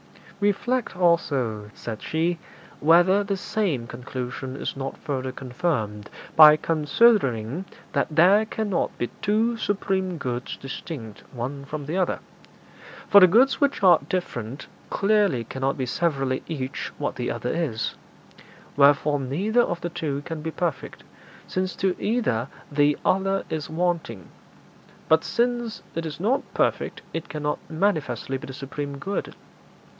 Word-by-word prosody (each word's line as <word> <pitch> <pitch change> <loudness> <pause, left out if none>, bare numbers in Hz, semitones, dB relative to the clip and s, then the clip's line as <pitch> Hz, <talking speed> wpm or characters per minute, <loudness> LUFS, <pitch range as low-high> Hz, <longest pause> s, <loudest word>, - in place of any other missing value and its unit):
'Reflect, 205 +2 0
also,' 135 - +1
said 110 -2 -6
she, 165 +2 0 0.4
'whether 175 +6 +5
the 200 -1 -2
same 185 - -1
conclusion 125 +2 -6
is - - -4
not 135 0 -5
further 130 -4 -3
confirmed 125 -6 -3 0.3
by 155 -1 +10
considering 155 - +2 0.3
that - - +1
there 180 +7 +5
cannot 215 -4 -1
be - - 0 0.2
two 220 +3 +2
supreme 190 -4 -1
goods 125 -3 -4
distinct 135 -5 -7
one 135 +3 -5
from 145 0 -5
the 155 +5 -3
other. 185 - +1 0.9
For 200 - +9
the 185 - +10
goods 235 - +4
which 280 -7 +1
are 175 -4 +7
different 135 -8 -3 0.2
clearly 200 - +2
cannot 135 +4 -2
be 130 - -1
severally 135 -2 0
each 135 -6 -4
what - - -2
the - - -2
other - - -2
is: 145 -10 -1 0.8
wherefore 145 +1 +4
neither 185 - +1
of 175 -7 -1
the 175 - -2
two 145 -4 -3
can 160 -2 -5
be 160 - -3
perfect, 165 -3 -3 0.4
since 185 0 -2
to 190 -1 0
either 205 - 0 0.2
the 145 0 +3
other 195 +1 +2
is 155 -2 -3
wanting; 160 - -2 0.8
but 160 0 +4
since 240 -1 -1
it 165 0 -3
is 150 -1 -7
not 230 +9 +2
perfect, - - 0
it 165 - -4
cannot 150 -1 -2
manifestly 160 -6 -1
be - - -9
the 135 - -7
supreme 140 +1 -5
good. 195 +8 -4
160 Hz, 140 wpm, -25 LUFS, 135-190 Hz, 0.9 s, by